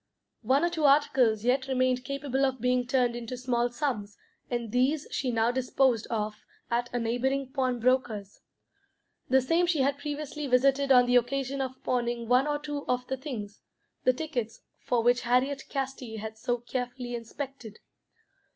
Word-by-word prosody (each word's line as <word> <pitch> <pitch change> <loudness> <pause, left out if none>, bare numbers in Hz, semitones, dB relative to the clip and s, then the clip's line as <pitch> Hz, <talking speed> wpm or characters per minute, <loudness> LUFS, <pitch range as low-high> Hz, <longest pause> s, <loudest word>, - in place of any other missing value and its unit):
One 260 +6 +2
or 345 - 0
two 320 -3 0
articles 265 -6 +4
yet 255 +2 +2
remained 255 -1 +1
capable 275 -1 -2
of 260 -1 +1
being 250 +1 +1
turned 250 -2 +2
into 240 +1 -5
small 245 -1 0
sums, 240 -6 -3 0.3
and 235 -3 -3
these 265 +5 +1
she 260 - -1
now 230 0 +2
disposed 255 -2 +1
of 215 -2 -2 0.4
at 240 +1 0
a 245 - -1
neighbouring 255 +3 -1
pawnbroker's 245 -5 0 0.9
the 265 0 +5
same 330 +7 +2
she 325 -5 +2
had 280 +1 +1
previously 295 0 -4
visited 275 +2 +3
on 250 -1 +7
the 245 0 +4
occasion 270 +2 -1
of 260 -1 -5
pawning 240 -1 -1
one 250 +4 +4
or 295 0 0
two 290 -1 -5
of 250 0 0
the 265 - 0
things, 230 -7 -7 0.4
the 255 - +5
tickets 255 -5 -4 0.2
for 240 -2 0
which 245 +1 +3
Harriet 260 +3 +1
Casti 265 -4 -4
had 220 +1 -6
so 240 +2 -1
carefully 245 0 -5
inspected. 235 -1 -7
255 Hz, 160 wpm, -28 LUFS, 240-275 Hz, 0.9 s, on